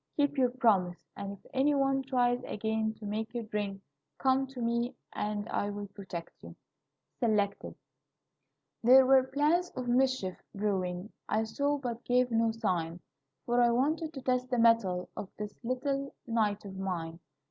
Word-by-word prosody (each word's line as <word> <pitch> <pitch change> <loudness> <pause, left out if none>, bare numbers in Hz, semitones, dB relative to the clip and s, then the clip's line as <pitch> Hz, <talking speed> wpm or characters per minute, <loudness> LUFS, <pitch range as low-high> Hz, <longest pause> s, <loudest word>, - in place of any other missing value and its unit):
Keep 290 -1 +2
your 260 -3 +3
promise, 205 -9 +2 0.2
and 200 0 -5
if 200 - -12
any 275 +3 +3
one 270 -1 +2
tries 250 -2 +1
again 220 +1 -1
to 215 - -10
make 220 +3 -3
you 235 - -2
drink, 205 -2 -3 0.3
come 265 0 +2
to 265 -1 -10
me, 235 +2 0 0.2
and 210 0 -2
I 205 - -1
will 205 -1 -5
protect 190 -4 -8
you." - - -11 0.6
Selected. 210 -4 0 1.1
"There 260 +3 +8
were 265 0 +7
plans 300 +6 +2
of 255 -1 -4
mischief 250 -6 +1
brewing; 190 -1 -1 0.2
I 220 +1 +2
saw, 285 +6 0
but 245 -4 -5
gave 250 0 +2
no 225 0 +3
sign, 175 -6 -1 0.4
For 240 0 +3
I 240 - +5
wanted 305 +7 +1
to 270 - -7
test 250 0 0
the 245 - 0
mettle 230 -6 +3
Of 195 - -6
this 210 -1 -5
little 275 +3 -2
knight 215 -3 0
of 195 -1 -8
mine. 170 -3 -3
230 Hz, 160 wpm, -31 LUFS, 205-260 Hz, 1.1 s, There